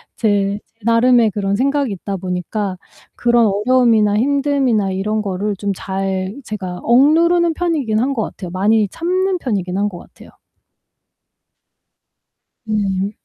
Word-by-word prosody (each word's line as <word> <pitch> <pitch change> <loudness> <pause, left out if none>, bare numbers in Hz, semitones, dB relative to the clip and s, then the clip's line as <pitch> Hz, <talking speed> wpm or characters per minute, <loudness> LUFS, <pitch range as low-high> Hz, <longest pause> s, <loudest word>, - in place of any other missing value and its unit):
제, 205 -2 0
제 225 - -45
나름의 230 -1 +4
그런 200 0 -1
생각이 275 0 0
있다 195 +1 -5
보니까 185 +2 -3 0.4
그런 235 -2 +3
어려움이나 215 0 +3
힘듦이나 270 -5 +1
이런 215 +3 -1
거를 200 +1 -2
좀 200 +1 -3
잘 190 +1 -3
제가 185 -5 -6
억누르는 330 +7 +4
편이긴 295 -11 -1
한 270 +3 0
것 230 - -2
같아요. 180 -3 -7
많이 210 +3 +2
참는 370 - -1
편이긴 190 - -2
한 205 0 +1
것 175 - -9
같아요. - - -16 2.4
음. 200 -2 -1
215 Hz, 265 characters per minute, -18 LUFS, 195-255 Hz, 2.4 s, 나름의